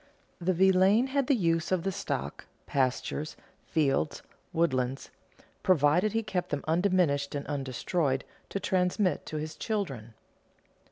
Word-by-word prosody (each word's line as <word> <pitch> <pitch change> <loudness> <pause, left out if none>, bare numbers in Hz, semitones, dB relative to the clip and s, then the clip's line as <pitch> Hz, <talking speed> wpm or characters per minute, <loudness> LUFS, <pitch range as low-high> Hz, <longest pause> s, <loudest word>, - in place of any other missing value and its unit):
The 185 +1 +1
villein 190 +7 +4
had 280 -3 +2
the 280 - +4
use 165 -6 +1
of 185 -3 +1
the 195 - 0
stock, 125 - -4 0.2
pastures, 135 +3 -1 0.3
fields, 150 -1 0 0.3
woodlands, 135 -5 0 0.5
provided 180 +4 +3
he 225 0 +1
kept 185 -4 -2
them 145 -1 -2
undiminished 165 -5 +2
and 140 - -3
undestroyed 135 +1 -1 0.3
to 200 - -2
transmit 185 -2 +1
to 155 - -4
his 155 +1 -4
children. 135 - -3
165 Hz, 125 wpm, -29 LUFS, 140-190 Hz, 0.5 s, villein